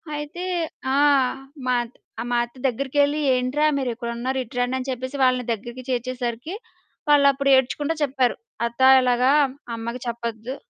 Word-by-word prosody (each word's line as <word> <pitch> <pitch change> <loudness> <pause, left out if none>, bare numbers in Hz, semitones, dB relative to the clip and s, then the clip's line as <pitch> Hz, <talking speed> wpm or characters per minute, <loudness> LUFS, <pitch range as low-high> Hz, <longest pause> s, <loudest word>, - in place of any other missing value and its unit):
అయితే 295 +4 -6 0.5
ఆ! - - +2 0.7
మాత్ 240 -1 0 0.3
ఆహ్, 245 - -5
అత్త 240 +2 -10
దగ్గరికెళ్ళి 285 +4 +1
"ఏంట్రా 255 +4 +1
మీరిక్కడున్నారు? 245 0 -3
ఇటు 245 +2 -15
రండి"? 245 +1 0
అని 260 0 -5
చెప్పేసి 260 +2 -4
వాళ్ళని 255 -1 +3
దగ్గరికి 240 +3 -5
చేర్చేసరికి, 250 +3 -3 0.6
వాళ్ళప్పుడు 280 -1 +4
ఏడ్చుకుంట 265 +4 +1
చెప్పారు. 260 -3 +1 0.3
అత్త 235 +2 -5 0.2
ఇలాగా 250 0 +2 0.5
"అమ్మకి 235 +2 -5
చెప్పొద్దు 235 +1 -4
255 Hz, 125 wpm, -23 LUFS, 240-275 Hz, 0.7 s, వాళ్ళప్పుడు